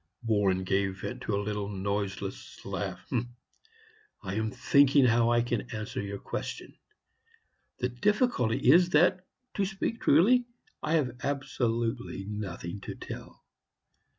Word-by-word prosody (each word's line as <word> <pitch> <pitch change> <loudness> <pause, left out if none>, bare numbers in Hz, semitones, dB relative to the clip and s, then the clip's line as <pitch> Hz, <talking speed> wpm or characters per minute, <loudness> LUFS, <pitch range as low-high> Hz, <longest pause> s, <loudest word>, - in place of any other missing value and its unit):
Warren 100 -4 +2
gave 95 +1 0
vent - - -5
to 105 - -1
a 100 0 -1
little 105 -1 -2
noiseless 100 0 -4
laugh. - - -4 1.2
"I 95 -1 -4
am 110 +1 0
thinking 135 +3 +4
how 115 -1 +4
I 120 0 +3
can 120 -1 -2
answer 110 -3 -4
your 100 0 -4
question. - - -6 1.0
The 125 - -1
difficulty 125 - +2
is 175 +3 +6
that, 180 +3 +3 0.3
to 200 - 0
speak 195 +4 -2
truly, 245 +7 +5 0.3
I 155 - -1
have 130 -7 +1
absolutely 120 -6 -2
nothing 100 -3 -5
to - - -6
tell. - - -9
115 Hz, 125 wpm, -29 LUFS, 100-140 Hz, 1.2 s, is